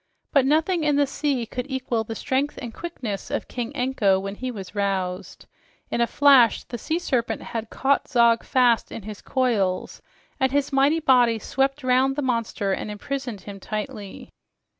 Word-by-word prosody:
But 275 -3 +4
nothing 320 +3 +2
in 295 -1 +2
the 285 0 +4
sea 275 -3 -1
could 250 +4 -5
equal 255 -4 -1
the 225 +1 -6
strength 270 +5 -1
and 235 -3 -7
quickness 250 - -5
of 285 - -3
King 245 0 -4
Anko 245 -8 +2
when 195 +1 -5
he 255 +5 -5
was 195 -6 -7
roused. 195 -2 -2 0.5
In 235 - 0
a 235 - +3
flash 270 -6 +5
the 240 - -7
sea 315 +9 -1
serpent 260 -9 -1
had 225 -1 -5
caught 275 +1 +1
Zog 235 -4 +4
fast 245 -3 +2
in 225 - -7
his 210 -1 -8
coils, 220 -8 0 0.4
and 265 -1 +2
his 280 0 0
mighty 280 +4 +3
body 245 -5 +4
swept 270 +5 -1
round 255 +1 +3
the 290 - -2
monster 230 -5 -1
and 210 - -4
imprisoned 240 0 -5
him 200 +1 -9
tightly. 210 -1 -6
250 Hz, 175 wpm, -24 LUFS, 215-275 Hz, 0.5 s, flash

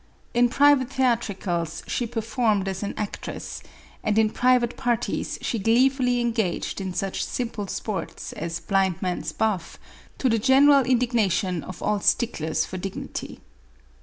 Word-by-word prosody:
In 240 0 +4
private 280 0 +4
theatricals 200 - -1
she 240 - -2
performed 225 -3 0
as 190 -1 -3
an 205 - -4
ac 210 -1 -2
tress, - - -6 0.4
and 215 -1 +1
in 220 -1 +4
private 250 -1 +2
parties 240 -4 -1
she 230 - -1
gleefully 250 +3 +3
engaged 225 -6 -1
in 190 -1 -3
such 195 +1 -2
simple 230 -4 -3
sports 190 -3 -5
as 165 +1 -4
blind 190 -3 +1
man's 180 -1 -2
buff, 210 -6 -1 0.4
to 265 - +1
the 230 -2 +2
general 275 +3 +6
indignation 225 - +1
of 185 -2 -8
all 210 0 +1
sticklers 165 -8 +1
for 185 - -6
dignity. 195 +1 -6
220 Hz, 140 wpm, -25 LUFS, 190-245 Hz, 0.4 s, general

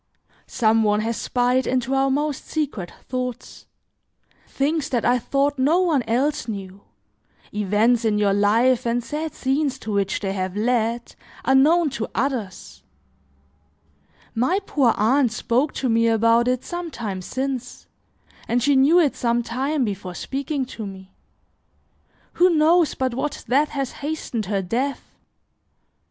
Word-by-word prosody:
Some 225 0 +2
one 210 -1 +2
has 230 +1 -2
spied 250 +2 0
into 255 0 0
our 270 0 +2
most 290 +1 -2
secret 280 - -3 0.2
thoughts; 250 -1 -5 0.8
things 295 +2 -1
that 240 -3 -1
I 245 +1 +3
thought 280 +3 0
no 300 +7 +3
one 325 -7 +2
else 255 +3 0
knew, 195 -2 -7 0.7
events 210 +4 +2
in 215 -2 +1
your 205 -1 +2
life 230 +5 +3
and 235 +1 0
sad 305 +4 -4
scenes 270 0 0
to 220 - -6
which 200 -1 0
they 195 -2 -3
have 185 -1 -3
led, 235 +1 0 0.3
are 265 - +3
known 305 +3 +4
to 235 -4 -3
others; 235 -7 -3 1.5
my 255 +12 +1
poor 255 -6 +2
aunt 245 +3 +3
spoke 250 +6 0
to 265 - -1
me 230 -1 +3
about 230 +1 +3
it 250 0 0
some 345 -1 -5
time 205 -9 -5
since, 260 +4 -4 0.6
and 240 0 +1
she 285 +1 +3
knew 285 +7 +5
it 300 -6 +2
some 235 0 0
time 265 +4 -1
before 190 -4 -5
speaking 275 - -3
to 225 -4 -7
me. 190 -1 -11 1.3
Who 365 - +7
knows 325 0 +3
but 260 -2 -1
what 285 +4 -3
that 285 +4 +2
has 275 -3 -3
hastened 280 -8 -4
her 200 -1 -1
death? 255 +9 -3
250 Hz, 145 wpm, -22 LUFS, 220-280 Hz, 1.5 s, Who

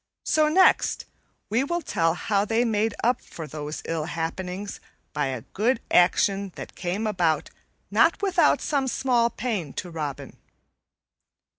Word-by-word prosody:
So 305 -1 +3
next 370 +4 +3 0.5
we 235 +5 +2
will 345 +4 -2
tell 165 -9 +1
how 200 +2 0
they 225 +3 +1
made 220 -1 0
up 245 +3 +2
for 165 - -9
those 150 +1 -6
ill 165 -2 -2
happenings 180 +4 -4 0.3
by 145 -1 0
a 130 -3 -4
good 225 +4 +1
action 195 +2 +3
that - - -8
came 190 +4 -3
about 175 -7 0 0.4
not 230 +11 +4
without 395 -2 +3
some 280 -3 0
small 245 -2 +2
pain 205 - -3
to 180 - -5
Robin. 145 -4 -5
200 Hz, 140 wpm, -25 LUFS, 165-240 Hz, 0.5 s, not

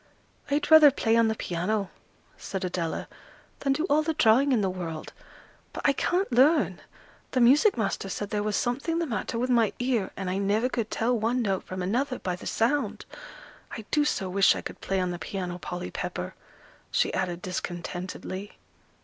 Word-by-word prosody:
"I'd 290 +2 0
rather 315 -2 +10
play 230 -4 +1
on 230 -1 +4
the 220 - 0
piano," 190 +2 -2 0.4
said 190 -1 -5
Adela, 175 -2 -3 0.5
"than 275 - 0
do 305 - -1
all 305 -3 +3
the 315 0 -2
drawing 255 +5 +4
in 240 -5 +3
the 195 - +1
world. 165 -4 -6 0.6
But - - -6
I 280 - +4
can't 360 +6 0
learn; 285 +6 +3 0.5
the 255 - +2
music 275 - +5
master 200 -3 -2
said 205 +1 -4
there 210 -1 0
was 210 0 -1
something 275 +10 -1
the 340 - 0
matter 230 -3 -3
with 250 +2 0
my 230 -3 +3
ear, 245 -6 0
and 195 - -4
I 185 +2 -1
never 210 +5 +1
could 230 -4 -2
tell 240 +2 0
one 235 +2 0
note 195 -3 -1
from 185 0 -5
another 255 +7 0
by 180 -1 -3
the 180 - -9
sound. 275 +6 0 0.7
I 220 - -8
do 300 - +3
so 195 -9 -1
wish 195 +2 +4
I - - -4
could - - -8
play 195 0 -1
on 180 -1 0
the 175 - -5
piano, 180 0 -4
Polly 175 0 -5
Pepper!" - - -4 0.6
she - - +1
added 180 -2 -2
discontentedly. 185 +1 -5
220 Hz, 185 wpm, -27 LUFS, 185-255 Hz, 0.7 s, rather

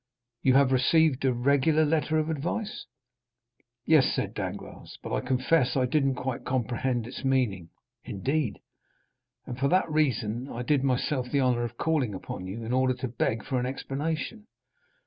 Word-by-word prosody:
You 130 -1 +4
have 135 -1 +5
received 135 +2 +3
a 130 - +4
regular 140 +5 +3
letter 155 +1 +1
of 155 +1 0
advice?" 175 +8 -3 1.0
"Yes," 155 -5 +5
said - - -2
Danglars, - - -7
"but - - -5
I - - +1
confess 130 +2 +1
I 130 - +3
didn't 135 0 +1
quite 125 0 -4
comprehend 125 -1 -1
its 125 +3 -8
meaning." 120 -11 0 0.3
"Indeed?" 125 +2 -2 0.8
"And 125 0 -6
for 140 - +2
that 185 +4 +3
reason 125 -5 0
I 120 - -5
did 140 0 +2
myself 130 -1 0
the 140 +1 +1
honor 125 -2 +2
of 120 0 -5
calling 145 - 0
upon 90 0 -6
you, 110 +5 -6
in 115 +2 -3
order 130 0 +2
to 130 +1 -4
beg 115 -2 -1
for 130 - -1
an 125 - -1
explanation." 155 - -4
130 Hz, 165 wpm, -27 LUFS, 120-150 Hz, 1.0 s, have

